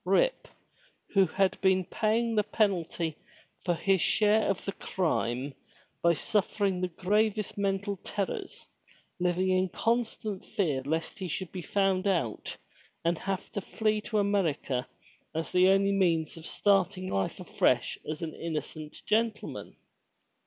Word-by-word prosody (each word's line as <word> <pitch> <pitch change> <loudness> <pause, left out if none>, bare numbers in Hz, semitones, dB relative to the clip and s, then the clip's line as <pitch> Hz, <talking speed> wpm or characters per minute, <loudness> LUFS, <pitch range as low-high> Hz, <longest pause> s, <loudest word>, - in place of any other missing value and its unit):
Rip, - - +2 0.7
who 195 -2 +5
had 190 +3 +1
been 190 -1 +3
paying 225 +4 +1
the 215 - +4
penalty 180 -6 0 0.5
for 175 -2 +1
his 190 +1 +2
share 215 0 +3
of 195 - -1
the 195 - -1
crime 140 -9 -1 0.5
by 170 0 +4
suffering 200 -1 0
the 185 - +1
gravest 210 +4 0
mental 200 0 -1
terrors, 195 +1 -4 0.5
living 180 +1 +1
in 185 0 +2
constant 225 -2 -1
fear 150 -9 0
lest 160 +3 -2
he 190 - -3
should 180 +2 -4
be 185 - -5
found 195 +1 +1
out 165 - -1 0.5
and 170 0 +2
have 195 -1 -3
to 205 - -3
flee 215 +1 0
to 215 0 -2
America 170 -11 +1 0.5
ai 160 - +1
the 180 +1 +5
only 195 +1 +4
means 170 -5 +2
of 165 -1 -8
starting 190 -2 +2
life 95 - -1
afresh - - +1
as 155 +2 -3
an 160 - -4
innocent 155 -1 -5
gentleman. 220 0 -1
190 Hz, 140 wpm, -29 LUFS, 170-205 Hz, 0.7 s, who